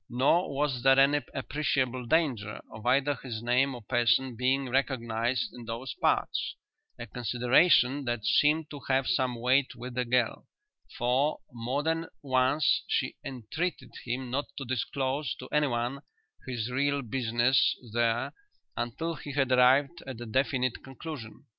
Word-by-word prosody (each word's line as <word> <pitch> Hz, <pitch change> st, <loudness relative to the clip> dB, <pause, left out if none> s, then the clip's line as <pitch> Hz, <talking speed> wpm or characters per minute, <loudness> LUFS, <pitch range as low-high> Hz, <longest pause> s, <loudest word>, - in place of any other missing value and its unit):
Nor 140 Hz, +9 st, +2 dB
was 140 Hz, -3 st, 0 dB
there 135 Hz, +1 st, +5 dB
any 145 Hz, +2 st, +4 dB
appreciable 130 Hz, -3 st, -1 dB
danger 125 Hz, -9 st, 0 dB
of 110 Hz, +2 st, -8 dB
either 140 Hz, +3 st, +3 dB
his 115 Hz, -4 st, -6 dB
name 125 Hz, +3 st, +2 dB
or 120 Hz, -, -10 dB
person 120 Hz, +2 st, +2 dB
being 130 Hz, +3 st, +1 dB
recognized 120 Hz, -2 st, -1 dB
in 120 Hz, -1 st, -10 dB
those 115 Hz, +3 st, -5 dB
parts, -, -, +1 dB, 0.4 s
a 120 Hz, -, -6 dB
consideration 125 Hz, -, +3 dB
that 120 Hz, -3 st, -2 dB
seemed 150 Hz, +4 st, +3 dB
to 145 Hz, -, -7 dB
have 135 Hz, 0 st, +2 dB
some 130 Hz, -2 st, +1 dB
weight 130 Hz, +3 st, +2 dB
with 125 Hz, +1 st, -7 dB
the 125 Hz, 0 st, 0 dB
girl, 125 Hz, -1 st, 0 dB, 0.5 s
for, 130 Hz, +5 st, +1 dB, 0.2 s
more 125 Hz, +5 st, -2 dB
than 165 Hz, +1 st, -1 dB, 0.2 s
once, 130 Hz, +2 st, +2 dB
she -, -, -1 dB
entreated 135 Hz, +8 st, -4 dB
him 125 Hz, +1 st, -4 dB
not 140 Hz, +3 st, -1 dB
to 135 Hz, -, -4 dB
disclose 130 Hz, +3 st, -2 dB
to 130 Hz, -, -10 dB
anyone 135 Hz, -3 st, 0 dB, 0.5 s
his 120 Hz, -2 st, -3 dB
real 140 Hz, +2 st, 0 dB
business 120 Hz, +1 st, +2 dB, 0.2 s
there 120 Hz, +1 st, +1 dB, 0.4 s
until 120 Hz, +8 st, -3 dB
he 145 Hz, -2 st, -8 dB
had 135 Hz, -2 st, +1 dB
arrived 135 Hz, +6 st, +4 dB
at 130 Hz, -3 st, -6 dB
a 120 Hz, -, -6 dB
definite 130 Hz, +1 st, 0 dB
conclusion. 135 Hz, -4 st, -9 dB
130 Hz, 145 wpm, -29 LUFS, 120-140 Hz, 0.5 s, there